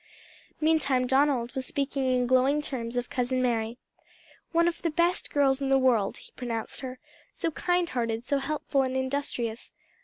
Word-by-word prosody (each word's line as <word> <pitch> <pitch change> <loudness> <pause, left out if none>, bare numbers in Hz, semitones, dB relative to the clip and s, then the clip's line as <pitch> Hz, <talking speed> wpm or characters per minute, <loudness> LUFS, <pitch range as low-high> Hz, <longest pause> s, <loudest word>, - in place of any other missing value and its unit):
Meantime 280 -5 +3
Donald 265 -2 +2
was 260 -1 -3
speaking 275 -2 -1
in 250 -1 +2
glowing 260 +4 +3
terms 245 -5 -4
of 245 - -1
Cousin 255 +1 0
Mary. 235 -2 0 0.7
"One 335 0 +3
of 345 -1 -2
the 335 - 0
best 340 +3 +1
girls 275 -1 +2
in 270 - 0
the 270 - +5
world," 240 -7 +2
he - - -14
pronounced 230 -3 -4
her 255 -1 -6 0.3
"so 330 - -2
kind 355 +2 +1
hearted, 230 -4 -2
so 280 +2 0
helpful 280 0 0
and 260 0 -1
industrious. 260 -4 -2
260 Hz, 165 wpm, -28 LUFS, 245-285 Hz, 0.7 s, the